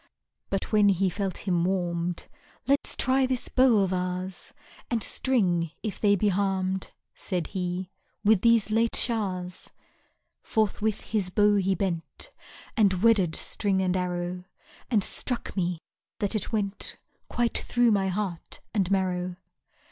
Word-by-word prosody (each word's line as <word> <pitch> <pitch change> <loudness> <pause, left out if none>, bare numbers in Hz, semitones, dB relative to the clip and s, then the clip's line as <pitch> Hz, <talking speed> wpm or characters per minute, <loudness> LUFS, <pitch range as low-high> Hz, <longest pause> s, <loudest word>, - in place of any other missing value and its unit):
But 195 +3 -2
when 210 -2 +5
he 190 -1 +2
felt 195 0 -3
him 175 -2 +2
warm'd: 175 -2 -1 0.4
Let's 280 +3 +1
try 260 0 +2
this 255 -1 -1
bow 250 -6 +5
of 190 -1 0
ours, 180 0 -3 0.4
And 230 -3 0
string, 180 -10 +1
if 210 -4 -4
they 205 -1 +5
be 205 +2 +2
harm'd, 190 -1 0 0.2
Said 180 -3 -3
he, 180 0 -3 0.3
with 210 -2 +4
these 230 -2 +4
late 230 +1 +2
showers. 185 -6 -1 0.7
Forthwith 215 -1 0
his 205 -4 -1
bow 205 +2 +4
he 190 0 +2
bent, 180 -5 -3 0.4
And 195 -5 +3
wedded 200 -8 +4
string 200 -3 -1
and 185 -1 +1
arrow, 180 0 -2 0.4
And 215 -5 +3
struck 245 +4 -3
me, 180 -2 0 0.4
that 205 +1 0
it 215 -4 -2
went 205 -2 -2 0.3
Quite 240 -1 +1
through 240 -1 +2
my 195 -2 +2
heart 190 -3 -3
and 195 -5 +1
marrow. 185 -2 0
195 Hz, 140 wpm, -27 LUFS, 180-215 Hz, 0.7 s, when